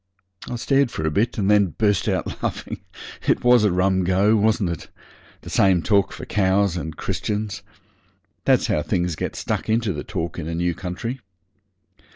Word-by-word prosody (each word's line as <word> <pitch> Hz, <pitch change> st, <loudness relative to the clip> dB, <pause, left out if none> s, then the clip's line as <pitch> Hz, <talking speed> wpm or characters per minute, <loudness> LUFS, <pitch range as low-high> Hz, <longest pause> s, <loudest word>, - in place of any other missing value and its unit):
I -, -, -3 dB
stared 135 Hz, +2 st, +2 dB
for 80 Hz, -8 st, -4 dB
a 80 Hz, -, +1 dB
bit, 115 Hz, +11 st, 0 dB
and 100 Hz, -3 st, 0 dB
then 100 Hz, -5 st, +3 dB
burst 105 Hz, -3 st, +2 dB
out -, -, -2 dB
laughing. -, -, -4 dB, 0.5 s
It -, -, +2 dB
was 125 Hz, -2 st, +6 dB
a 105 Hz, -, +3 dB
rum 95 Hz, +1 st, +2 dB
go, 95 Hz, +4 st, +3 dB
wasn't 105 Hz, -3 st, +2 dB
it? 85 Hz, -, -6 dB, 0.5 s
The -, -, -10 dB
same 95 Hz, -4 st, +3 dB
talk 100 Hz, -2 st, +2 dB
for -, -, -8 dB
cows 95 Hz, -2 st, +2 dB
and 80 Hz, -3 st, -5 dB
Christians. 105 Hz, -1 st, -3 dB, 0.8 s
That's -, -, +4 dB
how 75 Hz, -, +1 dB
things 90 Hz, 0 st, -1 dB
get -, -, -4 dB
stuck -, -, -3 dB
into 110 Hz, -2 st, +1 dB
the 75 Hz, -, -5 dB
talk 85 Hz, +1 st, -4 dB
in 80 Hz, -, -5 dB
a 85 Hz, -, -3 dB
new 85 Hz, +1 st, 0 dB
country. 95 Hz, +9 st, -5 dB
95 Hz, 180 wpm, -22 LUFS, 85-110 Hz, 0.8 s, was